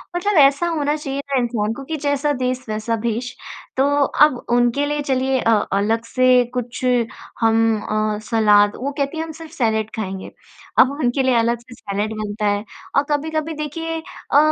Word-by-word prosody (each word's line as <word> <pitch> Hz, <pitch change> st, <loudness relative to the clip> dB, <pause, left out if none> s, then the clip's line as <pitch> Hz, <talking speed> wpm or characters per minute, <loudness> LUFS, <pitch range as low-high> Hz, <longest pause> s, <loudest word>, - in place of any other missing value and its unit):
मतलब 385 Hz, +2 st, +1 dB
ऐसा 285 Hz, +4 st, +5 dB
होना 300 Hz, -3 st, 0 dB
चाहिए 280 Hz, -2 st, -4 dB
ना 275 Hz, -, +1 dB
इंसान 225 Hz, -3 st, -1 dB
को 275 Hz, -, -8 dB
कि 320 Hz, -, -3 dB
जैसा 285 Hz, 0 st, 0 dB
देश 255 Hz, -1 st, -2 dB
वैसा 215 Hz, +2 st, -1 dB
भेष। 235 Hz, +2 st, -2 dB, 0.5 s
तो 265 Hz, -, +4 dB, 0.4 s
अब 295 Hz, -4 st, -1 dB, 0.2 s
उनके 245 Hz, +4 st, +2 dB
लिए 295 Hz, 0 st, -1 dB
चलिए 265 Hz, -1 st, 0 dB
अ, 230 Hz, -, +2 dB, 0.2 s
अलग 220 Hz, +3 st, +1 dB
से 255 Hz, +1 st, +4 dB
कुछ 250 Hz, 0 st, -4 dB, 0.6 s
हम 225 Hz, -1 st, +3 dB
अ, 215 Hz, 0 st, -1 dB
सलाद 210 Hz, -3 st, +4 dB
वो 275 Hz, +3 st, -3 dB
कहती 280 Hz, +2 st, -1 dB
हैं 320 Hz, -, -1 dB
हम 325 Hz, -, -7 dB
सिर्फ़ 325 Hz, -1 st, -10 dB
सैलड 220 Hz, -7 st, 0 dB
खाएँगे। 190 Hz, -3 st, -5 dB, 0.5 s
अब 260 Hz, -, +6 dB
उनके 255 Hz, 0 st, +1 dB
लिए 260 Hz, -1 st, +3 dB
अलग 235 Hz, 0 st, +2 dB
से 240 Hz, +1 st, -15 dB
सैलड 205 Hz, +1 st, -3 dB
बनता 210 Hz, +1 st, -3 dB
है 205 Hz, 0 st, 0 dB, 0.3 s
और 280 Hz, -, +4 dB
कभी-कभी 310 Hz, +2 st, -1 dB
देखिए 325 Hz, +2 st, -4 dB, 0.3 s
अ, -, -, +5 dB
250 Hz, 180 wpm, -20 LUFS, 225-285 Hz, 0.6 s, अब